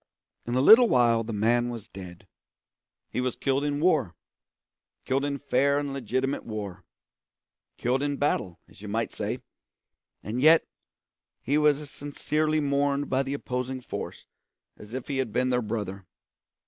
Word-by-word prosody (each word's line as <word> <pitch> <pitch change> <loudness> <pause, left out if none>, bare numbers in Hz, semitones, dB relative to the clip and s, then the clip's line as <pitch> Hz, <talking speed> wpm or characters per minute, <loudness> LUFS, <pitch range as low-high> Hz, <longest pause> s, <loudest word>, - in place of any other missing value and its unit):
In 120 - -1
a 130 - +3
little 225 - +8
while 115 -2 +4
the 115 - -5
man 120 +3 +2
was 115 -3 -7
dead. 95 -2 -11 0.9
He 125 - -1
was 125 -1 -1
killed 135 +1 0
in 145 0 -1
war; 150 - +2 0.9
killed 135 +1 0
in 140 -1 -1
fair 140 0 +2
and 145 -1 -2
legitimate 130 +1 -2
war; 100 -4 -6 0.9
killed 125 +3 0
in 145 -1 -1
battle, 105 - -1
as - - -18
you 105 - -8
might 115 +2 -1
say; - - -4 0.8
and 115 +5 -3
yet 160 +3 +6 0.8
he 140 - 0
was 150 -1 +4
as 150 -2 -9
sincerely 155 +2 -1
mourned 140 0 0
by 130 +1 +3
the 135 +1 -3
opposing 130 -1 -3
force 125 - -7 0.5
as 105 +4 -10
if 130 - -5
he 140 -2 -2
had 130 -5 -1
been 125 +3 +1
their 125 0 +2
brother. 100 -4 -4
130 Hz, 160 wpm, -27 LUFS, 115-145 Hz, 0.9 s, little